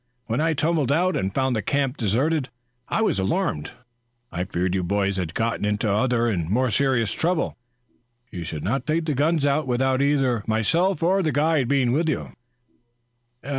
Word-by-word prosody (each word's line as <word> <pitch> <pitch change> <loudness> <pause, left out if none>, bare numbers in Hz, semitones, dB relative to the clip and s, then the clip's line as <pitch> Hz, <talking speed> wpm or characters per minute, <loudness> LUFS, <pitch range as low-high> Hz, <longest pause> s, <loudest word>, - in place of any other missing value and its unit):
When 120 +4 -1
I 160 0 +2
tumbled 150 -3 +1
out 180 +5 +2
and 95 0 -1
found 130 +2 0
the 110 - 0
camp 135 +4 0
deserted, 130 +6 0 0.4
I 225 - 0
was 155 - +1
alarmed. 85 -5 -1 0.6
I 90 +2 -3
feared 90 +1 -1
you 95 - 0
boys 100 +2 0
had 85 -2 -3
gotten 115 -2 -1
into 105 +1 0
other 115 +3 +1
and 85 -8 -1
more 125 +4 +1
serious 130 -4 +1
trouble. 170 0 -1 0.8
You 90 -4 -5
should 80 -2 -6
not 135 +10 -2
take 160 +1 0
the 155 - 0
guns 150 +2 +1
out 145 +1 +1
without 130 +1 +1
either 135 -6 +1
myself 165 - +1
or 190 +3 +3
the 160 -4 0
guide 145 -1 +2
being 130 -2 +2
with 160 +5 +1
you." 150 - -3
130 Hz, 175 wpm, -23 LUFS, 105-155 Hz, 0.8 s, or